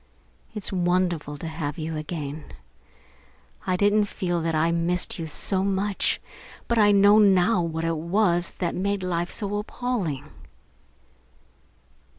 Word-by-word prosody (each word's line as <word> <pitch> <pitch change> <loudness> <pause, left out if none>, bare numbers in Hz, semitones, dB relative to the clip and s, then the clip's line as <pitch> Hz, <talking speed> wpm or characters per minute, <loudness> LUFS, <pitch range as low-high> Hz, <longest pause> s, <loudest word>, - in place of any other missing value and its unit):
It's 210 - 0
wonderful 175 -4 0
to 165 - -6
have 160 -1 -4
you 160 0 -4
again. 155 -1 -5 1.2
I 185 -1 +1
didn't 205 +2 +3
even 210 - +3
feel 175 -4 -2
that 165 0 -1
I 160 +2 +2
missed 170 +2 -1
you 165 - -4
so 190 +5 +1
much, 195 0 0 0.5
but 235 -1 +1
I 205 -1 +6
know 205 +1 +6
now 195 -1 +4
what 165 -1 -3
it 165 -1 0
was 175 +1 +1
that 175 - -1
made 200 +1 -1
life 175 -1 -1
so 205 -1 -4
appalling. 205 - -3
175 Hz, 140 wpm, -25 LUFS, 165-200 Hz, 1.2 s, I